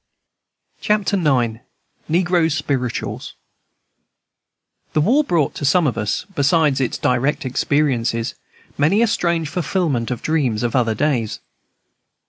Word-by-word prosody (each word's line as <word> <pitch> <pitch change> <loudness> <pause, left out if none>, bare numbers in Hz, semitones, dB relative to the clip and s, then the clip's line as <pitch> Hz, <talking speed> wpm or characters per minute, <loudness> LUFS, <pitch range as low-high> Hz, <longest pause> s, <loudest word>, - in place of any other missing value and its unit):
Chapter 210 -1 +1
9. 125 - +1 0.5
Negro 175 0 +2
Spirituals 135 -4 -3 1.6
The 155 - +2
war 255 - +3
brought 170 - 0
to - - -7
some 165 +5 +3
of 130 - 0
us, 105 -1 -2
besides 145 -2 +2
its 125 - -1
direct 135 +4 0
experiences, 125 -4 0 0.5
many 185 +10 +3
a - - +5
strange 170 -6 0
fulfilment 155 -6 -1
of 125 -3 -4
dreams 130 -9 0
of 120 +1 -1
other 115 -3 +2
days. 120 -4 -1
145 Hz, 115 wpm, -20 LUFS, 125-170 Hz, 1.6 s, a